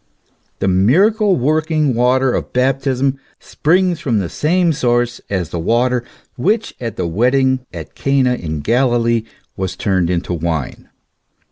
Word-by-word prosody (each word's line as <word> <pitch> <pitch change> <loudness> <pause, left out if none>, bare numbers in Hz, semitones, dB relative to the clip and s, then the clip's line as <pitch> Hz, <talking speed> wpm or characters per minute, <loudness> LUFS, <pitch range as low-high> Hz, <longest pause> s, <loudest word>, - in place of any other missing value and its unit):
The - - -1
miracle 190 - +3
working 155 +1 +1
water 125 +2 +2
of - - -4
baptism 135 +1 0 0.2
springs 180 +2 +1
from 120 -5 -1
the 95 -4 -1
same 170 +2 +1
source 120 -3 0
as 90 -5 -2
the 85 - -4
water 120 +6 +1 0.3
which 215 - 0
at 115 -3 -4
the 90 - -2
wed 115 +10 +1
ding 130 -1 +2
at - - -9
Cana 135 -2 +1
in 80 -9 -4
Galilee 115 - +1 0.3
was 95 -2 -3
turned 95 -4 0
into 90 0 -2
wine. 80 -4 -4
125 Hz, 140 wpm, -17 LUFS, 100-140 Hz, 0.3 s, miracle